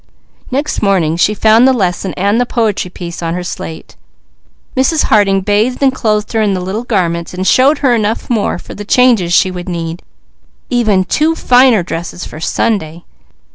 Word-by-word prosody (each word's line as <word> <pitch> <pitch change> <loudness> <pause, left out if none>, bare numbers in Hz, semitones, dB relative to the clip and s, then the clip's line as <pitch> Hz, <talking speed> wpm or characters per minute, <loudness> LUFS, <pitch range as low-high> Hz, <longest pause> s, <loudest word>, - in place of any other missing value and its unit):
Next 280 +4 -2
morning 185 -6 +1
she 205 +5 +1
found 220 +4 +4
the 265 - +4
lesson 190 -4 -2
and 200 +5 +1
the - - +1
poetry 215 -7 -1 0.3
on 165 0 -2
her 180 - -4
slate. 160 -2 -8 0.8
Mrs. 270 +4 +2
Harding 195 -3 +2
bathed 215 +7 0
and 265 -1 +3
clothed 215 -4 -1
her 225 - +1
in 205 -2 +1
the - - -2
little 190 +6 -4
garments, 175 -6 -2
and 185 +1 -3
showed 270 +8 +4
her 250 - +4
enough 220 -1 -1
more 225 -7 -1
for - - -11
the 205 - -7
changes 225 -5 +3
she 185 +1 +3
would 180 0 -7
need, 170 0 -5 0.7
even 215 -6 +2
two 315 - +1
finer 250 - +4
dresses 170 +1 -6
for 155 - -10
Sunday. 170 -2 -2
205 Hz, 175 wpm, -13 LUFS, 180-240 Hz, 0.8 s, found